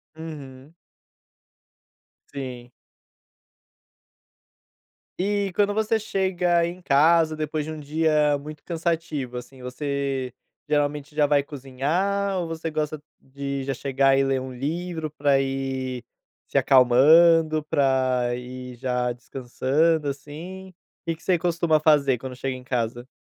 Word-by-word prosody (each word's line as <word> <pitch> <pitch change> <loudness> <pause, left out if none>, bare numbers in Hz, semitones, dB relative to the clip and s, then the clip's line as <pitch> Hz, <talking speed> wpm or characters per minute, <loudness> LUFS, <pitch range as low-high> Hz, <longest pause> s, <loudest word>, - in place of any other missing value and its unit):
Uhum. 145 -3 -10 1.6
Sim. 125 -3 -7 2.5
E 200 +1 0
quando 205 0 +2
você 220 +1 +1
chega 185 -4 +1
em 175 +1 -7
casa 160 +1 +4
depois 155 0 -3
de 160 - -5
um 155 - -6
dia 150 0 +2
muito 150 +1 -10
cansativo, 160 -7 -2
assim, 125 +1 -10
você 135 0 -3 0.4
geralmente 145 0 -1
já 150 -1 +4
vai 145 0 +3
cozinhar 155 +9 -1
ou 175 - -2
você 165 0 -4
gosta 155 -1 -3 0.2
de 140 0 -5
já 135 +1 -2
chegar 135 +1 +2
e 135 - +3
ler 135 -1 +1
um 130 0 -7
livro 160 +4 -3
pra 145 -2 +2
ir 130 -2 -3 0.4
se - - -22
acalmando, 155 +5 +5
pra 130 -4 +1
ir 125 0 -8
já 125 0 -1
descansando, 135 +6 0
assim? 160 +7 -7 0.3
Que 165 -1 -2
que 160 - -22
você 180 -3 +2
costuma 170 -2 +2
fazer 145 -5 +3
quando 130 -1 -7
chega 130 +1 -3
em 130 - -10
casa? 120 -1 -3
145 Hz, 125 wpm, -24 LUFS, 130-165 Hz, 2.5 s, acalmando